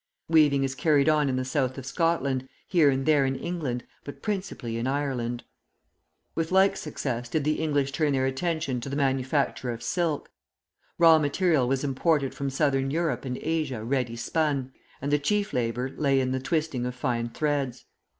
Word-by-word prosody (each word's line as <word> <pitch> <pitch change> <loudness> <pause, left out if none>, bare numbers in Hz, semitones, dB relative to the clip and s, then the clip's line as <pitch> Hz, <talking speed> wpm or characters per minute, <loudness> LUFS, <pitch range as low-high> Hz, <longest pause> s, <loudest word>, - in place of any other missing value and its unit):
Weaving 150 -4 +4
is 135 -1 -1
carried 145 +1 +2
on 150 -2 +3
in 130 - 0
the 130 0 -1
South 130 -1 -1
of 135 - -7
Scotland, 135 -4 0 0.2
here 165 -6 +4
and 135 0 0
there 150 -3 +4
in 135 0 0
England, 145 -8 -3 0.2
but 145 - -10
principally 190 - -3
in 115 +2 -2
Ireland. 130 -4 -2 0.9
With 165 +1 -2
like 190 +1 +5
success 125 -8 -4
did 155 +4 0
the 155 +1 0
English 145 -3 +1
turn 150 0 +1
their 130 -1 +1
attention 135 -1 -1
to 135 - -5
the 140 - -3
manufacture 135 -1 0
of 120 0 -5
silk. 170 -5 -1 0.7
Raw 165 -2 +7
material 150 -2 +2
was 135 +1 0
imported 140 0 +1
from 140 -1 -3
Southern 135 -1 +1
Europe 160 0 -1
and 125 -1 -3
Asia 155 -8 -2
ready 125 -1 -1
spun, 140 0 -1 0.3
and 140 - -1
the 145 - +3
chief 205 +8 0
labour 125 +2 -1
lay 140 -2 +2
in 130 -1 0
the 130 - 0
twisting 145 -3 -1
of 125 - -5
fine 120 -2 -1
threads. 140 -2 -2
140 Hz, 180 wpm, -27 LUFS, 130-155 Hz, 0.9 s, Raw